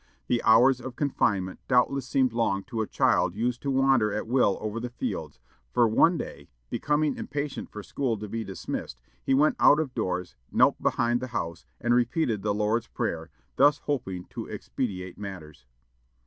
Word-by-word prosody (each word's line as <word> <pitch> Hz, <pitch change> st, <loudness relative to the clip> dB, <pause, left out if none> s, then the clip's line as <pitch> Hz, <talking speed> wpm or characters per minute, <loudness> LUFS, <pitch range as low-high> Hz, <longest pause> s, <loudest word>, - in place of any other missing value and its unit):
The 120 Hz, -, +1 dB
hours 125 Hz, +3 st, +5 dB
of 130 Hz, 0 st, -7 dB
confinement 100 Hz, -10 st, 0 dB
doubtless 130 Hz, +1 st, +2 dB
seemed 130 Hz, -3 st, +2 dB
long 100 Hz, -4 st, 0 dB
to 115 Hz, +2 st, -3 dB
a 110 Hz, -, -2 dB
child 85 Hz, -, +2 dB
used 120 Hz, +2 st, -1 dB
to 140 Hz, -, -2 dB
wander 135 Hz, -5 st, +3 dB
at 105 Hz, +1 st, -2 dB
will 120 Hz, -4 st, +2 dB
over 110 Hz, +1 st, -3 dB
the 120 Hz, +1 st, -4 dB
fields, 120 Hz, -, -5 dB, 0.3 s
for 120 Hz, -1 st, +4 dB
one 165 Hz, +10 st, +4 dB
day, -, -, -7 dB, 0.2 s
becoming 150 Hz, 0 st, +1 dB
impatient 145 Hz, 0 st, -4 dB
for 105 Hz, -, -8 dB
school 125 Hz, -2 st, -2 dB
to 105 Hz, +1 st, -6 dB
be 115 Hz, +2 st, -3 dB
dismissed, 95 Hz, -, -6 dB, 0.2 s
he 135 Hz, -, +2 dB
went 150 Hz, +3 st, +3 dB
out 150 Hz, -, +6 dB
of 145 Hz, -5 st, -2 dB
doors, 90 Hz, -6 st, -3 dB, 0.2 s
knelt -, -, +3 dB
behind 120 Hz, +1 st, +1 dB
the 130 Hz, -, -4 dB
house, 85 Hz, 0 st, -5 dB
and 120 Hz, 0 st, +1 dB
repeated 120 Hz, -2 st, +1 dB
the 105 Hz, +1 st, 0 dB
Lord's 105 Hz, +3 st, 0 dB
Prayer, 80 Hz, 0 st, -3 dB, 0.3 s
thus 145 Hz, +2 st, +5 dB
hoping 95 Hz, -11 st, -3 dB
to -, -, -6 dB
expedite 95 Hz, -7 st, -4 dB
matters! 85 Hz, -10 st, -9 dB
115 Hz, 175 wpm, -27 LUFS, 100-135 Hz, 0.3 s, out